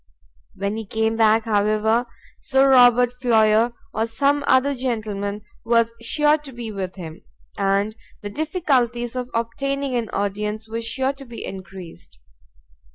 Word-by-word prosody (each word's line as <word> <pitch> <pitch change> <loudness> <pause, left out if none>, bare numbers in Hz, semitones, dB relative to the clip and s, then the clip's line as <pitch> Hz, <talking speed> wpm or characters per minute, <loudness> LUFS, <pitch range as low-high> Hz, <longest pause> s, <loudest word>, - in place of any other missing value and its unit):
When 200 +2 -2
he 225 - -5
came 220 +1 0
back, 220 0 +3
however, 215 +2 +1 0.3
Sir 270 -1 +3
Robert 245 -1 +6
Floyer, 225 -1 +4 0.2
or 220 +1 0
some 280 +6 +1
other 260 +2 +4
gentleman, 210 -5 -3 0.2
was 230 0 +2
sure 300 +5 +2
to 290 -2 -10
be 235 -3 -6
with 190 -3 -5
him, 165 -4 -9 0.3
and 200 +2 0 0.3
the 205 - -5
difficulties 255 - 0
of 250 -1 -3
obtaining 275 +4 -2
an 235 -2 -1
audience 210 +2 -3
were 225 +1 -4
sure 260 +4 -1
to 275 0 -11
be 235 -2 -8
encreased. 185 - -9
230 Hz, 140 wpm, -22 LUFS, 210-255 Hz, 0.3 s, Robert